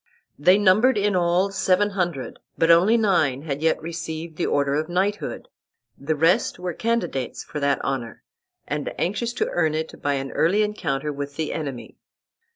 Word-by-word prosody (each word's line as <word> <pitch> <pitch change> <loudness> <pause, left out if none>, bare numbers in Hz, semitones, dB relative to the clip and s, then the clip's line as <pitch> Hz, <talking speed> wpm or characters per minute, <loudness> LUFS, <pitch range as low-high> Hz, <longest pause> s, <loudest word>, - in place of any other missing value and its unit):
They 180 +6 +5
numbered 210 +5 +4
in 205 -1 +1
all 180 +2 +2
seven 195 +1 +2
hundred, 175 -9 -3 0.2
but 165 +1 +4
only 185 +8 +5
nine 160 - +2
had 145 -2 -4
yet 160 0 +2
received 165 0 -6
the - - -1
order 140 -1 +1
of 155 +3 -1
knighthood; 195 +4 -2 0.5
the 155 +3 -2
rest 165 +4 +2
were 180 -1 -4
candidates 225 - -2
for 150 - -6
that 140 -1 +1
honor, 130 -4 -4 0.4
and 150 0 -3
anxious 220 +6 -1
to - - -1
earn 160 -3 +1
it 160 +1 -5
by 145 - 0
an 135 0 -4
early 195 +7 +2
encounter 150 -9 -2
with 140 0 -6
the 160 0 -2
enemy. 140 -6 -6
165 Hz, 165 wpm, -23 LUFS, 145-190 Hz, 0.5 s, They